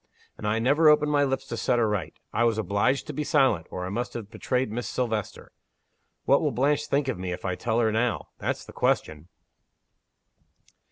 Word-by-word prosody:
And 105 - -5
I 105 +1 +1
never 145 +7 +4
opened 150 0 +4
my 145 -1 +3
lips 135 -1 -1
to 120 - -5
set 120 +1 +1
her 115 -2 +3
right! 95 -8 -2 0.2
I 120 - +2
was 115 -2 +2
obliged 110 +5 +1
to 150 - -6
be 150 - -2
silent, 135 - +2
or 90 - -5
I - - -4
must 120 +5 -3
have 110 -3 -6
betrayed 125 +1 -1
Miss 120 +2 -3
Silvester. 110 -5 -3 0.7
What - - +4
will - - +1
Blanche 145 +4 +1
think 140 0 +1
of 125 -8 -2
me, 90 -1 -3
if 90 - -6
I 95 - 0
tell 110 +5 -1
her 110 -2 +2
now? 115 +2 -1
That's - - -3
the - - -12
question!" 80 +1 0
120 Hz, 205 wpm, -26 LUFS, 105-135 Hz, 0.7 s, never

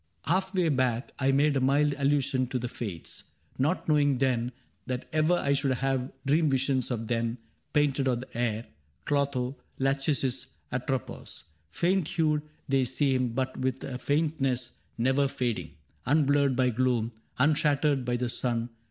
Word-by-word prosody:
^^ - - -15
Halfway 190 -1 +1
back 130 -3 0
I 135 0 +3
made 140 +2 +3
a 135 - +2
mild 145 +3 +3
allusion 140 -2 +1
to 130 - -2
the 125 0 -3
Fates, 100 -9 -7 0.3
Not 155 +8 +1
knowing 145 -3 +3
then 125 -2 +1 0.4
that 125 -1 -3
ever 155 +3 +3
I 140 -5 +1
should 140 -1 +1
have 135 -1 -1
Dream 155 +3 +3
visions 135 -1 +1
of 115 -3 -2
them, 115 0 -1 0.3
painted 145 -2 +2
on 125 -2 +1
the 130 - -12
air, 115 -1 -1 0.2
— 70 -2 -40
Clotho, 140 -2 0 0.2
Lachesis, 135 -1 0 0.2
Atropos. 125 0 -4 0.3
Faint 175 - +1
hued 155 -3 +1 0.3
They 135 -1 +3
seem, 130 -2 +1
but 130 +1 -1
with 130 0 -2
a 125 -2 -5
faintness 135 -4 0 0.3
never 130 +4 +2
fading, 115 - -3 0.3
Unblurred 140 -2 +3
by 125 0 +3
gloom, 120 -1 +1 0.3
unshattered 145 -1 +2
by 125 0 0
the 125 0 -1
sun. 120 -1 -1
135 Hz, 150 wpm, -28 LUFS, 125-145 Hz, 0.4 s, I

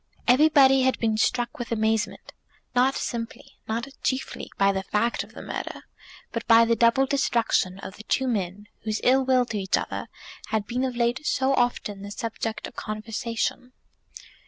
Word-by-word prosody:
Everybody 270 0 +6
had 260 0 +2
been 220 -2 +1
struck 240 +3 0
with 240 - -5
amazement, 220 0 -1 0.4
not 255 +2 +3
simply, 230 -2 -5
not 230 +3 -2
chiefly, 260 0 -2
by 195 0 +4
the 190 -1 -2
fact 210 +4 0
of - - -16
the - - -8
murder, - - -5 0.5
but 230 - -3
by 230 -1 +7
the 230 0 +2
double 235 +4 +4
destruction 235 -8 +1
of 195 0 -9
the 215 - -10
two 265 +3 +1
men 205 -3 -2 0.2
whose 215 -1 -1
ill 265 +2 +4
will 255 -1 +3
to 220 -3 -3
each 190 -1 +1
other - - -4 0.4
had 215 -2 -1
been 245 +4 -2
of 255 -2 -3
late 240 +4 0
so 265 +1 +2
often 245 -5 0
the 200 - -7
subject 225 +1 -4
of - - -10
conversation. 225 +3 -3
230 Hz, 170 wpm, -25 LUFS, 215-255 Hz, 0.5 s, by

